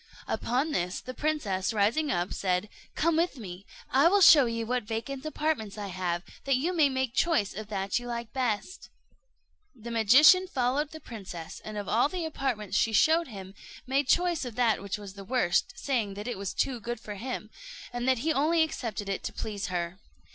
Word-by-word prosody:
Upon 265 +6 0
this 180 -7 -1
the 255 - -8
princess, 235 -11 -1
rising 225 +9 +2
up, 175 -8 -1
said, 185 +1 -1 0.3
"Come 335 0 +2
with 335 -3 +1
me, 190 -4 -9 0.2
I 275 +5 +5
will 400 +4 +4
show 290 -7 +8
you 230 0 -2
what 250 +2 0
vacant 235 +5 -5
apartments 300 -10 -2
I 205 -1 -5
have, 180 -1 -2 0.2
that 275 -1 +3
you 320 +8 0
may 305 -4 +5
make 260 -2 -1
choice 260 - +1
of 215 +1 -6
that 195 0 -1
you 245 - -9
like 235 -1 -5
best." 250 - -2 0.9
The 235 -1 -8
magician 275 - +6
followed 270 0 0
the 315 - -9
princess, 190 - -8
and 215 0 -6
of 205 -2 -4
all 240 +6 +3
the 350 0 -3
apartments 260 -10 -1
she 225 - +1
showed 325 +8 +4
him, 195 -5 -9 0.3
made 270 +1 +1
choice 350 -1 +2
of 245 -4 -6
that 235 -5 +2
which 200 0 -3
was 200 -2 -9
the 200 0 -10
worst, 250 - +1
saying 230 - -1
that 205 +3 -6
it 245 - -4
was 195 -3 -4
too 260 -3 0
good 240 +1 -5
for 215 -3 -7
him, 220 0 -5 0.4
and 245 +1 -2
that 260 +1 +2
he 320 - +3
only 320 +4 +3
accepted 230 -9 -4
it 195 - -2
to - - -2
please 205 -4 -4
her. 175 0 -3
235 Hz, 200 wpm, -28 LUFS, 205-280 Hz, 0.9 s, show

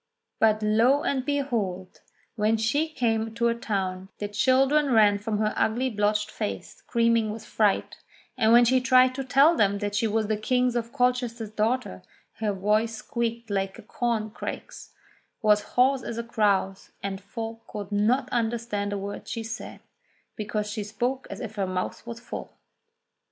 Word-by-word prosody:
But 215 -1 +3
lo 230 +7 +3
and 265 -2 0
behold! 230 -10 -2 0.3
when 220 0 +2
she 280 +9 +1
came 225 -6 -1
to 235 0 +2
a - - +2
town, 190 -5 -3
the 205 - -3
children 265 +7 +3
ran 210 -3 +5
from 210 +1 -2
her 215 0 0
ugly 250 +4 +1
blotched 210 0 0
face 210 - -5
screaming 230 -1 +1
with 215 +1 -6
fright, 210 -3 +1 0.4
and 220 0 +3
when 240 +1 +7
she 255 +2 +3
tried 255 0 +5
to 270 +1 -4
tell 275 +6 +5
them 200 -6 +2
she 205 +3 +1
was 220 0 0
the 215 0 0
King 250 +3 +1
of 230 -1 -2
Colchester's 245 -4 0
daughter, 215 - -1 0.4
her 215 -2 0
voice 210 +3 +1
squeaked 230 -1 -3
like 195 -1 -1
a - - -11
corn 220 -1 -2
crake's, - - -7 0.5
was 210 -1 +5
hoarse 260 +2 +4
as 230 - -5
a 235 - -2
crow's, 200 -4 0
and 195 -1 -4
folk 225 +2 -7
could 205 -1 -7
not 235 +6 +2
understand 225 -3 -1
a 205 - -2
word 200 +1 -6
she 230 - -4
said, 225 0 -7 0.5
because 210 0 -3
she 210 0 -3
spoke 240 +6 -3
as - - -7
if 225 -4 -6
her 195 -2 0
mouth 185 +5 -4
was 235 0 -6
full 240 - -8
225 Hz, 165 wpm, -26 LUFS, 210-245 Hz, 0.5 s, when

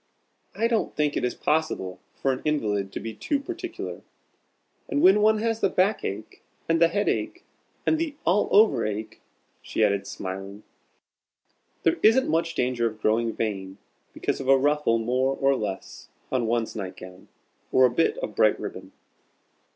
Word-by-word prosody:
I 230 - +2
don't 230 -2 -1
think 150 -1 0
it - - -1
is 125 - -1
possible 150 -13 -1 0.2
for 135 - 0
an 130 - -6
invalid 105 -10 -1
to - - -4
be 115 - -6
too 280 - -1
particular. 345 +4 -6 0.9
And 285 - 0
when 200 -3 +6
one 215 +1 +4
has 225 +1 -1
the - - +2
back 195 +3 +1
ache, 105 +3 -6 0.3
and 165 0 +2
the 170 - +7
head 205 +5 -1
ache, 335 +3 -2 0.4
and 320 - +2
the 320 -3 -2
all 190 +5 +2
over 200 - +5
ache," 110 +1 -4 0.4
she 110 - -1
added, 100 -2 +1
smiling, 95 +2 -6 1.2
"there 165 - +3
isn't 235 +5 +5
much 165 +1 0
danger 125 -2 +1
of 110 -1 -7
growing 115 +2 +1
vain 95 -4 -4 0.3
because - - -2
of 135 - -5
a 135 0 +6
ruffle 145 -3 +2
more 130 +4 0
or 135 0 +3
less 100 -5 -6 0.2
on 125 -3 0
one's 115 0 -1
night 95 -3 -5
gown, 90 0 -12 0.4
or 130 - +6
a 125 - +3
bit 165 - +1
of - - -4
bright - - +3
ribbon." - - -7
130 Hz, 170 wpm, -25 LUFS, -, 1.2 s, the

